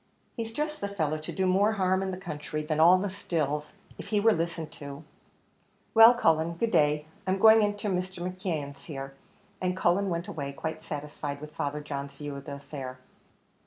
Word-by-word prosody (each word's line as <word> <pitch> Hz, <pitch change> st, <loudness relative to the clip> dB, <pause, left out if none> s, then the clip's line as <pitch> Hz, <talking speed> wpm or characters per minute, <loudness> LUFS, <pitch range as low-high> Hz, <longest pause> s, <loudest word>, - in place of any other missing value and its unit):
He's 225 Hz, -2 st, -4 dB
just 300 Hz, +4 st, -3 dB
the -, -, -1 dB
fellow 155 Hz, -6 st, -1 dB
to 155 Hz, -, -6 dB
do 190 Hz, -, 0 dB
more 195 Hz, +4 st, +3 dB
harm 190 Hz, -2 st, +2 dB
in 195 Hz, -, -1 dB
the 185 Hz, -, -4 dB
country 155 Hz, -4 st, -5 dB
than 155 Hz, 0 st, -1 dB
all 175 Hz, +3 st, +8 dB
the 195 Hz, +1 st, -2 dB
stills, 150 Hz, -5 st, -2 dB, 0.2 s
if -, -, -7 dB
he 210 Hz, -, +2 dB
were 225 Hz, +2 st, +5 dB
listened 165 Hz, -1 st, -3 dB
to. 140 Hz, +1 st, -7 dB, 0.9 s
Well, 225 Hz, +2 st, +9 dB
Cullen, 165 Hz, -6 st, +2 dB
good 225 Hz, +6 st, 0 dB
day, 150 Hz, 0 st, +3 dB, 0.2 s
I'm 190 Hz, +1 st, +2 dB
going 220 Hz, +2 st, +7 dB
into 205 Hz, 0 st, 0 dB
Mr. 185 Hz, -1 st, -2 dB
McKeon's 165 Hz, -7 st, -4 dB
here;" 135 Hz, -3 st, -6 dB, 0.5 s
and 185 Hz, 0 st, 0 dB
Cullen 190 Hz, +3 st, +2 dB
went 170 Hz, 0 st, -2 dB
away 140 Hz, -3 st, -4 dB
quite 160 Hz, +2 st, -5 dB
satisfied 145 Hz, -1 st, -5 dB
with 150 Hz, +1 st, -9 dB
Father 145 Hz, +1 st, -2 dB
John's 140 Hz, -1 st, -5 dB
view 145 Hz, 0 st, -6 dB
of 140 Hz, 0 st, -8 dB
the 140 Hz, -, -5 dB
affair. 135 Hz, -2 st, -7 dB
165 Hz, 190 wpm, -28 LUFS, 150-190 Hz, 0.9 s, Well